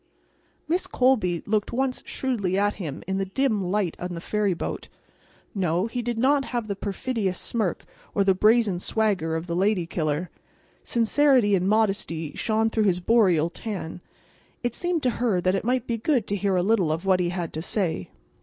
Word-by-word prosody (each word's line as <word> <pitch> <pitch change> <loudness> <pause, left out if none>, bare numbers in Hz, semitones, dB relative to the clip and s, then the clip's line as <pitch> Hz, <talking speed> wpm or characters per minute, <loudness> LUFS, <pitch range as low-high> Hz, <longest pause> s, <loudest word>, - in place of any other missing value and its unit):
Miss 360 +4 +1
Colby 235 - +2
looked 210 0 0
once 260 +1 -1
shrewdly 205 -8 -1
at 205 +1 +1
him 150 -6 -5
in 190 +1 -2
the 195 - 0
dim 215 +1 0
light 185 -1 0
on 180 0 -4
the - - -5
ferry 205 +1 0
boat. - - -5 0.6
No; 180 -1 0
he 245 +2 -3
did 240 0 -3
not 270 +3 +3
have 240 -3 -3
the 200 - -2
perfidious 200 -1 -2
smirk 215 -7 -2 0.3
or 200 - +3
the 195 -1 +4
brazen 210 -1 +3
swagger 190 -6 0
of 160 +1 -3
the 170 -1 -3
lady 190 -1 +2
killer. 160 0 -2 0.5
Sincerity 245 -2 +3
and 190 0 +2
modesty 195 -8 0
shone 220 0 0
through 220 -1 +1
his 180 -3 +2
boreal 180 -6 +3
tan. 180 -4 -6 0.6
It 240 -1 -1
seemed 350 0 -1
to 250 - +3
her 220 -7 +2
that 185 +1 +1
it 195 - -1
might 250 +1 0
be 235 -2 -2
good 245 -2 +1
to 200 - 0
hear 200 -1 0
a 180 - +2
little 195 -6 +2
of 165 +4 -3
what 190 -1 +3
he 175 -1 +1
had 175 -2 -4
to 155 - -3
say. 165 - -2
200 Hz, 190 wpm, -25 LUFS, 180-230 Hz, 0.6 s, the